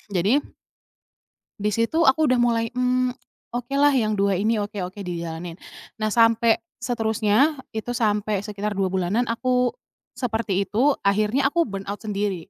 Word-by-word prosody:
Jadi 200 Hz, +10 st, +3 dB, 1.2 s
di 210 Hz, +1 st, 0 dB
situ 230 Hz, +10 st, +1 dB
aku 315 Hz, 0 st, +4 dB
udah 255 Hz, -1 st, +3 dB
mulai, 230 Hz, -1 st, +2 dB
mmm, 250 Hz, 0 st, +1 dB, 0.4 s
oke 245 Hz, +2 st, -4 dB
lah, 290 Hz, 0 st, +5 dB
yang 215 Hz, -5 st, +1 dB
2 200 Hz, 0 st, +2 dB
ini 220 Hz, +4 st, +1 dB
oke 205 Hz, 0 st, -4 dB
oke, 185 Hz, +2 st, -6 dB
dijalanin. 170 Hz, -1 st, -5 dB, 0.5 s
Nah, 215 Hz, -, +1 dB
sampai 230 Hz, 0 st, +4 dB, 0.2 s
seterusnya 225 Hz, +4 st, +2 dB, 0.2 s
itu 220 Hz, +2 st, -3 dB
sampai 210 Hz, -3 st, 0 dB
sekitar 210 Hz, 0 st, -4 dB
2 195 Hz, -1 st, 0 dB
bulanan 190 Hz, +5 st, +1 dB
aku 250 Hz, +1 st, +1 dB, 0.5 s
seperti 220 Hz, -5 st, -1 dB
itu, 265 Hz, +8 st, +2 dB
akhirnya 215 Hz, +7 st, +2 dB
aku 340 Hz, +4 st, +1 dB
burnout 200 Hz, 0 st, -6 dB
sendiri. 200 Hz, -4 st, -3 dB
220 Hz, 145 wpm, -23 LUFS, 200-245 Hz, 1.2 s, lah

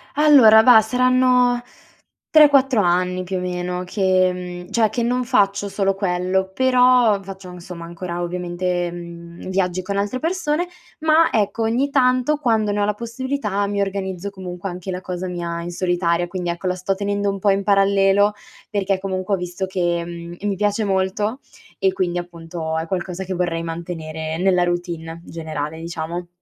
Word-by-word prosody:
Allora, 275 Hz, -8 st, +7 dB
vah, 230 Hz, 0 st, +8 dB
saranno 250 Hz, +1 st, +3 dB, 0.7 s
3-4 275 Hz, -6 st, +5 dB
anni 180 Hz, 0 st, +1 dB
più 185 Hz, +1 st, -3 dB
o -, -, -2 dB
meno 180 Hz, 0 st, -3 dB
che, 185 Hz, -1 st, +2 dB, 0.3 s
mhmm, 180 Hz, -, -13 dB
cioè 220 Hz, -2 st, +3 dB
che 240 Hz, -, -2 dB
non 250 Hz, +2 st, 0 dB
faccio 200 Hz, -3 st, +1 dB
solo 195 Hz, -1 st, 0 dB
quello, 190 Hz, 0 st, -1 dB
però 250 Hz, -3 st, +4 dB
faccio 190 Hz, -1 st, -9 dB
insomma 175 Hz, -1 st, -9 dB
ancora 175 Hz, +1 st, -5 dB
ovviamente, 175 Hz, 0 st, -2 dB
mhmm, 170 Hz, 0 st, -10 dB
viaggi 185 Hz, -1 st, 0 dB
con 200 Hz, +2 st, -3 dB
altre 205 Hz, +6 st, -1 dB
persone, 330 Hz, 0 st, -1 dB, 0.3 s
ma 320 Hz, +1 st, +4 dB
ecco 220 Hz, +1 st, 0 dB
ogni 245 Hz, +5 st, +1 dB
tanto, 255 Hz, +1 st, +2 dB
quando 225 Hz, -7 st, +1 dB
ne 205 Hz, 0 st, -1 dB
ho 205 Hz, -, +2 dB
la 210 Hz, -, 0 dB
possibilità 235 Hz, -2 st, -3 dB
mi 200 Hz, 0 st, -1 dB
organizzo 195 Hz, -1 st, -3 dB
comunque 185 Hz, -1 st, -7 dB
anche 180 Hz, +1 st, -6 dB
la 180 Hz, -, -4 dB
cosa 180 Hz, 0 st, -5 dB
mia 170 Hz, -1 st, -4 dB
in 175 Hz, -, -5 dB
solitaria. 175 Hz, -1 st, 0 dB
Quindi 175 Hz, 0 st, -4 dB
ecco, 170 Hz, +2 st, -5 dB
la 180 Hz, -, 0 dB
sto 185 Hz, +1 st, -1 dB
tenendo 200 Hz, +1 st, -1 dB
un 195 Hz, -, -5 dB
po' 200 Hz, -, +2 dB
in 195 Hz, 0 st, +2 dB
parallelo 200 Hz, 0 st, +3 dB, 0.4 s
perché 195 Hz, -2 st, 0 dB
comunque 190 Hz, 0 st, -3 dB
ho -, -, +3 dB
visto 180 Hz, +1 st, -4 dB
che, 175 Hz, -2 st, -1 dB
mhmm, 170 Hz, 0 st, -8 dB
mi 205 Hz, -1 st, 0 dB
piace 205 Hz, +2 st, 0 dB
molto 200 Hz, +4 st, -1 dB, 0.4 s
e 190 Hz, -1 st, +3 dB
quindi 175 Hz, -2 st, -1 dB
appunto 165 Hz, -2 st, -5 dB
è 160 Hz, -, -2 dB
qualcosa 180 Hz, +1 st, -4 dB
che 190 Hz, 0 st, -4 dB
vorrei 175 Hz, -2 st, -1 dB
mantenere 160 Hz, -1 st, -5 dB
nella 180 Hz, 0 st, +3 dB
routine 170 Hz, -2 st, -3 dB
generale, 160 Hz, -1 st, -5 dB
diciamo. 170 Hz, +1 st, -5 dB
190 Hz, 170 wpm, -21 LUFS, 175-210 Hz, 0.7 s, vah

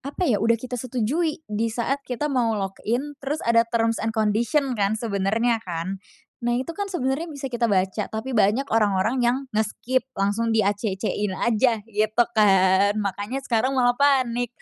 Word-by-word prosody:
apa 280 Hz, +6 st, -5 dB
ya, 220 Hz, -, +2 dB
udah 230 Hz, +1 st, +3 dB
kita 250 Hz, +1 st, -6 dB
setujui 270 Hz, +7 st, -1 dB
disaat 230 Hz, +5 st, -2 dB
kita 250 Hz, +3 st, -3 dB
mau 230 Hz, -4 st, +1 dB
log 195 Hz, -1 st, -2 dB, 0.2 s
in, 265 Hz, +6 st, -1 dB
terus 285 Hz, +3 st, -3 dB
ada 230 Hz, 0 st, +3 dB
terms 230 Hz, -1 st, 0 dB
and 225 Hz, +1 st, -3 dB
condition 235 Hz, +6 st, +1 dB
kan, 210 Hz, -2 st, 0 dB
sebenernya 220 Hz, +2 st, 0 dB
kan? 185 Hz, 0 st, -5 dB, 0.4 s
Nah, 240 Hz, 0 st, 0 dB
itu 265 Hz, +7 st, -3 dB
kan 400 Hz, +3 st, -4 dB
sebenernya 315 Hz, -2 st, -2 dB
bisa 280 Hz, -4 st, -6 dB
kita 240 Hz, -1 st, +1 dB
baca, 190 Hz, +1 st, 0 dB
tapi 220 Hz, +5 st, -5 dB
banyak 220 Hz, +3 st, +3 dB
orang-orang 215 Hz, +3 st, +2 dB
yang 240 Hz, +1 st, +2 dB, 0.2 s
nge-skip, 230 Hz, +5 st, -1 dB
langsung 225 Hz, +3 st, 0 dB
di-acc-in 205 Hz, -1 st, -1 dB
aja 225 Hz, -1 st, +1 dB
gitu 215 Hz, +1 st, +1 dB
kan? 195 Hz, -1 st, +4 dB
Makanya 205 Hz, +6 st, -3 dB
sekarang 260 Hz, +2 st, 0 dB
malah 245 Hz, -1 st, +4 dB
panik. 245 Hz, -3 st, +2 dB
230 Hz, 160 wpm, -24 LUFS, 210-255 Hz, 0.4 s, kan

